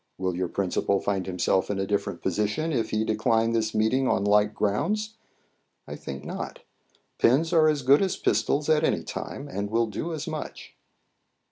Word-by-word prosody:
Will 95 -1 -1
your 90 0 -1
principal 100 +2 0
find 95 -2 -2
himself 95 0 +1
in 100 - -1
a 95 - -1
different 100 +1 -2
position 130 +11 -1
if 115 -4 0
he 110 0 0
decline 110 +1 +1
this 110 -1 0
meeting 125 +5 +2
on 95 - +1
like 105 +1 +4
grounds? 185 - -1 0.7
I - - -6
think 70 +1 -8
not. - - -6 0.6
Pens 155 +8 +3
are 155 -2 +5
as 150 -3 0
good 140 +3 +5
as 190 -2 0
pistols 145 +1 +1
at 155 -1 +3
any - - +1
time, 145 - -6
and 100 -6 -4
will 115 +2 +2
do 110 - -4
as 155 -3 -5
much." - - -6
110 Hz, 175 wpm, -26 LUFS, 100-145 Hz, 0.7 s, are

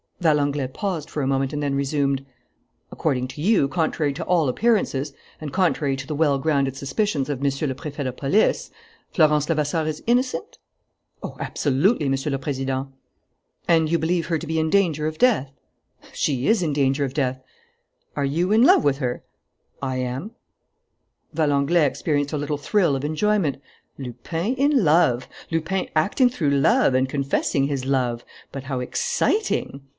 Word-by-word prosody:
Valenglay 145 -5 +1
paused 170 +1 -4
for 150 - -3
a - - 0
moment 135 0 0
and 150 -1 -3
then 140 -1 0
resumed: 140 -1 0 0.7
"According 130 -5 -1
to 145 - -8
you, 190 -5 +3
contrary 155 -2 0
to - - -5
all 165 -6 +2
appearances, 150 - 0 0.3
and 150 -2 -6
contrary 160 -7 +1
to 135 0 -6
the 155 - -4
well 145 -2 +2
grounded 140 -2 0
suspicions 140 +1 -1
of 140 -3 -3
Monsieur 140 +2 0
le 130 - -1
Préfet 145 +2 -6
de 130 - -2
Police, 140 +11 +1 0.4
Florence 150 -3 +3
Levasseur 155 0 0
is 155 -1 -4
innocent?" 255 - 0 0.6
"Oh, - - -7
absolutely, 150 - +1
Monsieur 135 +2 -1
le 135 - 0
Président!" 135 -1 -3 0.8
"And 160 -2 +3
you 170 - +3
believe 165 +1 0
her 165 -2 0
to - - -7
be 160 +1 -1
in 160 0 0
danger 160 -5 +2
of 155 0 -4
death?" 185 - +2 0.6
"She 135 -3 -1
is 220 -3 +3
in 155 -4 0
danger 140 0 +1
of 135 -1 -3
death." 130 -3 -1 0.7
"Are 140 - 0
you 170 +7 0
in 220 +2 +5
love - - +6
with 140 -1 +1
her?" 125 -3 -3 0.6
"I 130 -1 -2
am." 130 - -4 1.0
Valenglay 150 +1 +2
experienced 145 +1 -1
a - - 0
little 145 +1 -2
thrill 170 0 +1
of 135 - -4
enjoyment. 160 -1 +1 0.4
Lupin 140 - -3
in 275 -2 +3
love! 150 -6 +3 0.2
Lupin 165 +3 -1
acting 205 - +3
through 160 - -1
love 155 - +3
and 130 0 +2
confessing 140 0 0
his 140 -3 -3
love! 125 -3 0 0.3
But 135 -1 -6
how 135 -2 -3
exciting! 140 - -1
145 Hz, 165 wpm, -23 LUFS, 135-165 Hz, 1.0 s, love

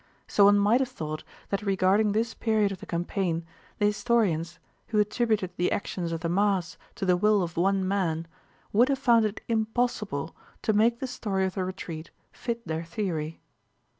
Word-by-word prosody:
So 200 - +5
one 205 0 +7
might 205 +5 +4
have 260 - 0
thought 155 0 -5 0.3
that 200 - -1
regarding 200 +1 +3
this 225 +2 0
period 215 -3 +1
of 190 - -6
the - - -10
campaign 170 -1 -1 0.3
the 205 - +2
historians, 205 -6 +1 0.3
who 225 - -1
attributed 210 -2 +1
the 175 - +1
actions 175 -4 -2
of 165 -1 -3
the 170 - -1
mass 185 -1 +1 0.2
to - - -3
the 180 -1 +4
will 210 +1 +3
of 170 -1 -5
one 190 +2 +2
man, 170 -5 0 0.5
would 240 +6 +5
have 275 - +2
found 235 -4 +4
it 215 0 -3
impossible 220 - -1 0.3
to 220 - +2
make 230 +3 +3
the - - -1
story 195 -6 -1
of 190 - -2
the 190 - -2
retreat 175 -3 -6 0.2
fit 235 -1 -5
their 160 +1 -2
theory. 165 -3 -3
200 Hz, 180 wpm, -27 LUFS, 175-220 Hz, 0.5 s, one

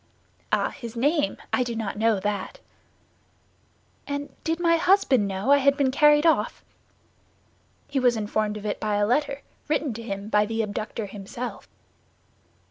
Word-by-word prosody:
"Ah, - - +1
his 235 -1 -9
name? 290 +5 +1 0.2
I - - +3
do 240 -2 -2
not 225 -3 -3
know 220 -1 +2
that." 205 -1 -3 1.5
"And 285 0 -5
did 325 +1 -1
my 335 -1 +3
husband 325 - +3
know 195 +7 -1
I 285 - +7
had 280 +1 +3
been 275 -3 +2
carried 295 +2 +5
off?" 325 - +1 1.2
"He 280 - -1
was 245 -2 +3
informed 215 0 -1
of 210 - -9
it 205 - -2
by 210 -1 -1
a 205 0 +2
letter, 280 +4 0 0.2
written 300 -3 0
to 230 - -7
him 200 -3 -5
by 210 -1 +2
the 225 0 -1
abductor 215 +1 -4
himself." 205 +5 -7
235 Hz, 155 wpm, -25 LUFS, 210-285 Hz, 1.5 s, I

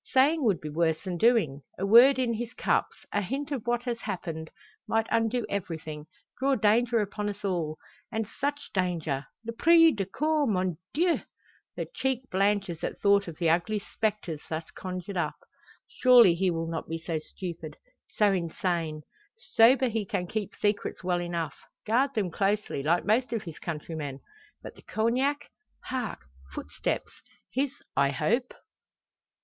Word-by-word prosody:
Saying 285 +4 +4
would 200 -6 +3
be 155 - -6
worse 160 +1 +1
than 180 -3 -4
doing. 210 - +3 0.2
A 195 - -1
word 240 +7 +8
in 250 -3 +1
his 235 +2 -5
cups - - 0
a 205 - +2
hint 275 +8 -3
of 255 -5 -3
what 240 0 +1
has 240 -2 -2
happened 165 -6 -5 0.4
might 225 +1 +2
undo 230 +1 +1
everything: 160 -5 -5 0.3
draw 270 +1 +3
danger 230 +1 +3
upon 205 0 -3
us 205 0 -6
all! 165 -5 -1 0.3
And 220 0 -1
such 285 +5 -3
danger 165 -7 -1 0.2
l'prise 325 +8 +5
de 195 -3 -2
corps, 300 +6 +1
mon 185 -5 0
dieu!" 340 +3 +2 0.6
Her - - -2
cheek 260 -1 -1
blanches 195 -3 +1
at - - -3
thought 200 -1 +4
of 165 -2 -7
the 165 -2 +2
ugly 180 +6 +1
spectres 205 -7 -3
thus 160 0 -4
conjured 185 +1 -5
up. 155 -4 -1 0.5
"Surely 245 -8 +6
he 185 +2 +1
will 165 -1 -1
not 165 -1 -4
be 165 - -2
so 165 -1 -3
stupid 160 -1 -7 0.3
so 210 -1 +3
insane? 170 -3 -2 0.3
Sober 260 - +4
he 225 -2 -1
can 180 -2 -2
keep 210 +2 -4
secrets 205 -2 -1
well 180 -1 +1
enough 170 -4 -3 0.3
guard 260 +5 +2
them 200 -5 0
closely, 200 -4 0
like 165 +5 +2
most 230 +4 +2
of 225 - -2
his 165 -3 -9
countrymen. 150 -4 -5 0.4
But - - -8
the - - -17
Cognac? 255 +6 0 0.3
Hark 250 -4 -3 0.3
Footsteps! - - -3 0.4
His 275 +2 -2
I 140 - +4
hope." 215 - 0
200 Hz, 155 wpm, -28 LUFS, 170-240 Hz, 0.6 s, word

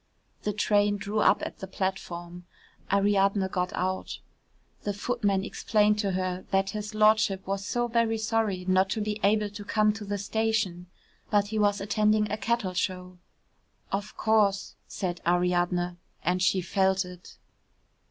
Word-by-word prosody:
The 210 - -1
train 205 0 +2
drew 205 +2 -2
up - - +4
at - - -8
the 190 - -6
platform. 180 -2 -4 0.5
Ariadne 200 0 +3
got 180 0 -1
out. 185 +1 -2 0.6
The 205 -1 -3
footman 205 -3 0
explained 210 0 +2
to 200 -3 0
her 185 0 -2
that 195 0 +1
his 210 0 -5
Lordship 215 -2 +3
was 195 0 -2
so 240 +4 -1
very 230 -1 +1
sorry 215 -4 -1
not 185 +1 +3
to - - -1
be 210 0 -2
able 210 +1 +2
to 205 0 -8
come 215 +1 +2
to 220 0 -7
the 205 0 -3
station, 205 -3 -1 0.4
but 205 -1 +2
he 220 0 -1
was 205 -1 +2
attending 210 +1 +1
a 210 - -1
cattle 225 -4 -1
show. 180 0 -3 0.7
"Of 205 +2 -3
course," 210 -3 +2
said 180 -2 -4
Ariadne, 175 0 +1 0.3
and 180 +2 +1
she 185 0 +3
felt 190 +1 +1
it. 180 0 -12
200 Hz, 150 wpm, -27 LUFS, 185-210 Hz, 0.7 s, up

